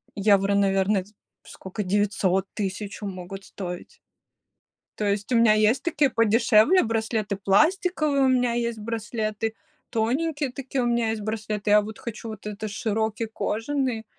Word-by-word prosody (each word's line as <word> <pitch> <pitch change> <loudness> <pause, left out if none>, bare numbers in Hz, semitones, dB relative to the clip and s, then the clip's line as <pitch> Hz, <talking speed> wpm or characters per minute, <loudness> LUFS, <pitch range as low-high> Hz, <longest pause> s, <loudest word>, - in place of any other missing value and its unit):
евро, 200 -1 +3
наверно, 195 0 +2
дь 205 +3 -22 0.3
скока 190 +3 -7
900-1000 195 +1 -1
могут 190 +1 -7
стоить. 180 - -8 0.9
То 210 - -2
есть 205 +3 -1
у 245 - +3
меня 230 -2 +6
есть 215 +5 +3
такие 295 -5 +2
подешевле 230 - +4
браслеты 220 -2 -1
пластиковые, 305 - +2
у - - +4
меня 250 -2 +2
есть 235 -1 -1
браслеты 220 0 -3 0.3
тоненькие 275 +5 -1
такие, 265 0 -3
у - - 0
меня 235 -2 +1
есть 220 -1 -2
браслеты. 215 -1 -2
Я 210 - +7
вот 210 +1 -8
хочу 230 -1 -7
вот 215 -2 -9
это 210 +1 -5
широкий 220 +1 -2
кожаный, 225 +2 -2
220 Hz, 140 wpm, -25 LUFS, 205-240 Hz, 0.9 s, Я